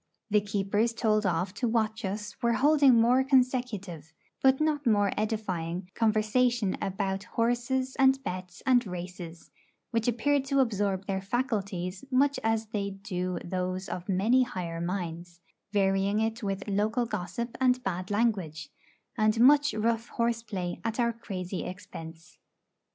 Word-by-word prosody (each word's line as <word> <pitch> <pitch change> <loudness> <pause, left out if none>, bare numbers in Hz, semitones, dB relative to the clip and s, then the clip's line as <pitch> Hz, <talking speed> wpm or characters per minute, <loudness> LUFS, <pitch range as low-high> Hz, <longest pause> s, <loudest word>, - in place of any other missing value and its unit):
The 210 0 +4
keepers 205 +3 0
told 215 -3 +2
off 180 +2 -1
to 240 +4 -1
watch 220 0 0
us 210 +2 -4
were 235 -1 +2
holding 280 +1 +5
more 240 +3 +4
consecutive, 245 - 0 0.3
but 265 0 +4
not 300 -3 0
more 205 -3 +3
edifying, 185 -5 -3
conversation 225 0 +2
about 195 0 -2
horses 245 +3 0
and 265 0 +5
bets 180 -1 -6
and 250 -2 +4
races, 175 -2 -8 0.4
which 230 -1 0
appear 265 +5 +2
to 275 +1 0
absorb 200 -6 0
their 190 -1 -2
faculties 195 -5 -2
much 275 +2 +2
as 225 0 +1
they 200 -2 -2
do 185 -2 -4
those 185 +1 -3
of 180 0 -6
many 215 +7 +3
higher 180 -9 -3
minds, 175 -1 -4 0.3
varying 195 0 +2
it 225 +1 -1
with 195 -1 -3
local 215 +4 +1
gossip 210 +2 -4
and 255 -1 +3
bad 185 -1 -3
language, 195 -9 -1 0.5
and 215 0 +2
much 290 +4 +6
rough 230 +1 0
horse 235 -1 -1
play 185 -6 -5
at 225 +1 -2
our 235 -1 +2
crazy 190 -5 -5
expense. 165 -2 -9
210 Hz, 140 wpm, -28 LUFS, 185-235 Hz, 0.5 s, much